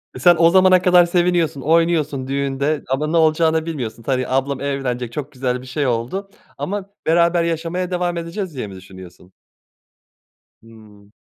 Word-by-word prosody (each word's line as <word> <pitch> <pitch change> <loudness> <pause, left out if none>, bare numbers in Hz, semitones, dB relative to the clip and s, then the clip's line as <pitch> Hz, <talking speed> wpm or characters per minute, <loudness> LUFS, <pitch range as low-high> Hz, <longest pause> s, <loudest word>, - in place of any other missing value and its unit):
E, - - -7
sen 175 +6 +6
o 165 0 +6
zamana 185 0 +5
kadar 180 -1 +5
seviniyorsun, 175 -4 +1
oynuyorsun 160 -4 +1
düğünde 140 +2 -1
ama 135 +3 -1
ne 165 +2 0
olacağını 160 0 +2
bilmiyorsun. 120 -8 -5
Tabii, 130 -1 -1
ablam 135 +1 -1
evlenecek, 130 -4 -3
çok 150 +1 -5
güzel 125 -2 -2
bir 130 - -12
şey 140 +2 -2
oldu. 125 - -2 0.3
Ama 200 0 -4 0.2
beraber 170 +1 +3
yaşamaya 170 +2 -3
devam 175 -1 -1
edeceğiz 170 0 -5
diye 125 -5 -4
mi 95 - -10
düşünüyorsun? 95 -1 -14 1.3
Hımm. 105 -3 -18
150 Hz, 155 wpm, -20 LUFS, 125-170 Hz, 1.3 s, sen